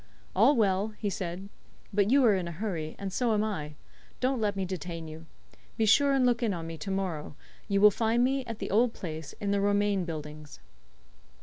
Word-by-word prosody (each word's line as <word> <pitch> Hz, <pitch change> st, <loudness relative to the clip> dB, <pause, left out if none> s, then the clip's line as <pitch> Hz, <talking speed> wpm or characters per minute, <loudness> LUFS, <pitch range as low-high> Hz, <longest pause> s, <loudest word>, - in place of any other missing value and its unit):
"All 235 Hz, +10 st, +5 dB
well," 210 Hz, -1 st, +1 dB
he 205 Hz, -2 st, -2 dB
said; 190 Hz, -1 st, -5 dB, 0.5 s
"but 200 Hz, 0 st, +2 dB
you 270 Hz, +1 st, +5 dB
are 220 Hz, -, +6 dB
in 185 Hz, -3 st, -1 dB
a -, -, -5 dB
hurry, 165 Hz, -4 st, -4 dB
and 195 Hz, -2 st, -5 dB
so 235 Hz, 0 st, +1 dB
am 210 Hz, -, +1 dB
I. 155 Hz, -9 st, -4 dB, 0.4 s
Don't 255 Hz, -1 st, 0 dB
let 205 Hz, -2 st, 0 dB
me 195 Hz, -1 st, -1 dB
detain 170 Hz, -2 st, -5 dB
you. 155 Hz, +1 st, -10 dB, 0.5 s
Be 220 Hz, -, +2 dB
sure 280 Hz, +6 st, +5 dB
and 265 Hz, -2 st, +3 dB
look 245 Hz, -1 st, +2 dB
in 220 Hz, -5 st, 0 dB
on 165 Hz, -1 st, -5 dB
me 165 Hz, 0 st, -6 dB
to 195 Hz, -, -5 dB
morrow. 180 Hz, -7 st, -3 dB, 0.3 s
You 200 Hz, 0 st, +1 dB
will 210 Hz, 0 st, +8 dB
find 230 Hz, +3 st, +1 dB
me 270 Hz, +1 st, +1 dB
at 230 Hz, -2 st, -5 dB
the -, -, -5 dB
old 230 Hz, +3 st, +3 dB
place, 160 Hz, -3 st, -7 dB
in 200 Hz, -1 st, -3 dB
the 200 Hz, 0 st, +1 dB
Romain 205 Hz, -1 st, +2 dB
Buildings." 150 Hz, -2 st, -7 dB
200 Hz, 210 wpm, -29 LUFS, 170-220 Hz, 0.5 s, will